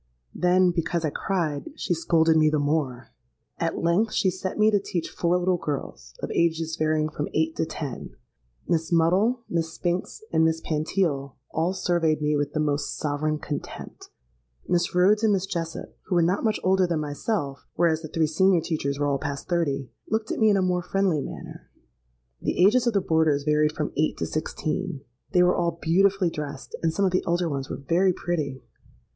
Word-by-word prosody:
Then, 180 0 +3
because 170 -1 -1
I 150 - 0
cried, 160 -7 -2
she - - -1
scolded 165 -1 +3
me 155 -1 +5
the 155 - +1
more. 145 -5 -1 0.5
At 165 0 -1
length 200 +6 +2
she 190 - +2
set 190 +1 -5
me 215 0 +4
to 205 - +3
teach 180 -3 -4
four 175 +1 +1
little 180 0 +1
girls, 65 - -5
of - - -3
ages 165 -1 +1
varying 155 -1 +1
from 150 -1 -4
eight 160 +1 +1
to 160 - 0
ten. 135 - -6 0.5
Miss 165 0 0
Muddle, 190 +9 +3
Miss 165 -1 -2
Spinks, 175 +4 -2
and 160 0 +4
Miss 160 0 +2
Pantile, 155 -3 -1 0.2
all 170 +3 0
surveyed 170 -4 +1
me 150 0 +1
with 145 0 -1
the 155 - -1
most 145 -1 -1
sovereign 155 +1 -1
contempt: 145 -1 -7 0.6
Miss 175 0 +1
Rhodes 200 +4 +4
and 215 -2 +4
Miss 195 -1 0
Jessop, 165 -3 -5
who 185 - -1
were 170 - +4
not 180 +4 +1
much 215 -2 +1
older 190 0 +3
than 170 -2 0
myself 145 - -3
(whereas 160 -2 +2
the 160 - -6
three 160 +1 +1
senior 180 +4 +3
teachers 140 -4 -2
were 145 - 0
all 140 -1 0
past 140 -2 -5
thirty) 145 -7 -1 0.2
looked 220 0 -1
at - - -2
me 220 -1 +5
in 200 - +4
a 190 - +2
more 180 -1 +1
friendly 185 -4 0
manner. - - -9 0.7
The 180 - +2
ages 240 +4 +4
of 235 - +2
the 200 - +2
boarders 160 -4 +2
varied 150 0 +2
from 150 -1 -3
eight 155 +1 +1
to - - -2
sixteen. 155 +1 -3 0.3
They 180 -2 +5
were 180 0 +4
all 170 -1 0
beautifully 190 +2 +3
dressed; 145 -3 -6
and 165 - +2
some 195 +5 +1
of 185 - +2
the 185 - +1
elder 175 0 +1
ones 135 -3 -3
were - - -4
very 185 +2 +3
pretty. 150 -7 -3
165 Hz, 195 wpm, -25 LUFS, 150-180 Hz, 0.7 s, me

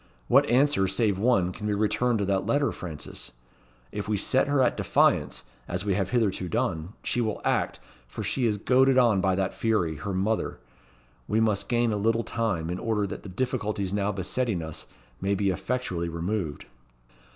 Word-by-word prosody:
What - - +5
answer, 130 -5 +3
save 95 0 +1
one, 100 -6 +3
can 105 +3 -6
be 105 - +1
returned 115 +3 +1
to 100 - 0
that 95 0 0
letter, 145 +4 +2
Frances? 80 -5 -7 0.6
If 105 -1 -4
we 105 -1 +1
set 130 +8 +2
her 145 -1 +2
at 125 - +2
defiance, - - +2 0.2
as 90 +3 -3
we 100 - +1
have 95 -1 0
hitherto 105 -7 0
done, 100 -6 -1
she 120 - 0
will 110 -3 -1
act, - - 0 0.3
for - - -6
she 125 -3 0
is 105 -2 0
goaded 130 +4 +4
on 115 -6 +4
by 95 0 +2
that 95 0 -1
fury, 90 -9 0
her 100 +4 -4
mother. 105 +4 0 0.7
We 110 - +1
must 105 -3 +1
gain 120 -2 +2
a - - 0
little 115 +3 +1
time, 95 -10 -2
in 90 - -3
order 110 -2 0
that 100 - -6
the 100 - -9
difficulties 105 -3 -2
now 100 0 +1
besetting 100 0 -2
us 80 -1 -7 0.3
may 100 +1 +1
be 100 0 +1
effectually 95 -4 -2
removed." 85 -1 -3
105 Hz, 185 wpm, -27 LUFS, 95-115 Hz, 0.7 s, What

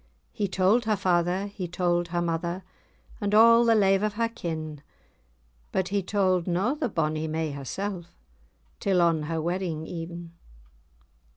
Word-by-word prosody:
He 205 - -2
told 195 +5 +2
her 215 -1 +2
father, 180 0 +1
he 200 -3 -5
told 175 0 0
her 175 0 -1
mother, 170 +2 -2 0.6
And 205 0 +1
a' 230 +1 +7
the 230 -1 +4
lave[#] 195 -2 +4
o' 215 - +1
her 230 +2 -1
kin; 160 -8 -5 0.9
But 190 -1 -1
he 200 0 0
told 185 -2 +1
na 185 +9 +1
the 295 -4 -2
bonny 155 -3 -1
may 160 0 -2
hersell, 175 +7 -4 0.7
Till 190 -2 +1
on 165 -2 +3
her 165 -1 -1
wedding 170 -1 -2
e'en. 170 0 -7
180 Hz, 150 wpm, -26 LUFS, 170-200 Hz, 0.9 s, a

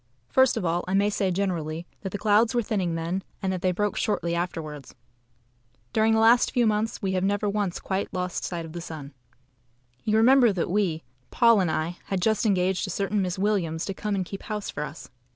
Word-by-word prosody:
First 260 -2 +4
of 205 - -2
all, 170 +1 0
I 185 - 0
may 205 +1 +3
say 195 -2 0
generally 175 -4 -2 0.2
that 195 - -4
the 205 - -3
clouds 220 +3 +3
were 240 - +2
thinning 190 -6 -1
then, 165 +3 -2 0.2
and 190 -1 -1
that 185 - -4
they 185 - +2
broke 205 +3 -1
shortly 185 -6 -1
afterwards. 160 -5 -4 1.0
During 220 0 +3
the - - +3
last 230 +2 +5
few 245 -2 +2
months 215 0 0
we 190 - 0
have 185 -1 0
never 205 +2 +1
once 200 -3 -1
quite 190 +1 -3
lost 180 -1 -3
sight 170 -2 -4
of 160 - -10
the 175 - -5
sun. 150 -4 -8 0.9
You 215 0 +2
remember 245 +1 +6
that 175 -2 -2
we 185 -6 0 0.3
(Paul 230 -3 +5
and 180 -3 +1
I) 160 +2 -2
had 195 - -2
just 220 +3 +1
engaged 190 -2 +1
a - - -6
certain 200 +2 -1
Miss 185 -1 -2
Williams 185 -5 0
to 195 - -3
come 210 +1 -2
and 190 -2 -1
keep 195 +2 -7
house 210 -1 -4
for 145 - -5
us. 150 +1 -9
190 Hz, 215 wpm, -26 LUFS, 175-210 Hz, 1.0 s, remember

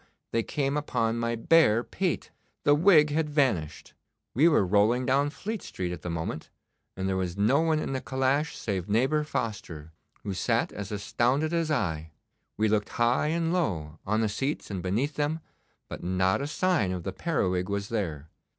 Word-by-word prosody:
they 115 - +1
came 140 +4 -1
upon 120 -6 0
my 115 0 0
bare 115 -2 +4
pate. 185 +4 -2 0.3
The 145 - +5
wig 155 -2 +5
had 155 0 0
vanished. 120 - 0 0.4
We 145 +7 +5
were 150 - +4
rolling 105 +6 +3
down 140 +3 +2
Fleet 215 +7 -5
Street 90 -1 -4
at 90 -3 -6
the 90 - -5
moment, 80 -1 -4 0.5
and 95 0 -2
there 95 - 0
was 90 -1 -2
no 120 +9 +3
one 160 -1 +2
in 155 - -2
the 130 - -2
calash 135 +4 0
save 95 -3 -3
neighbour 130 +8 +2
Foster, 105 - -4 0.3
who 100 - -3
sat 90 - 0
as 105 -1 -6
astounded 125 +9 0
as 165 -2 0
I. 80 - -1 0.4
We 110 - +2
looked 105 -1 +1
high 120 +5 +1
and 165 +1 0
low, 80 - -2
on 110 +3 0
the 110 - +2
seats 135 +4 -3
and 95 -3 -3
beneath 115 - -1
them, 150 +2 0 0.5
but - - -7
not 95 +4 +1
a 140 - -2
sign 165 - +1
of 90 -2 -4
the 95 - -4
periwig 95 - -1
was 100 0 -2
there. 80 -10 -3
115 Hz, 180 wpm, -28 LUFS, 95-150 Hz, 0.5 s, The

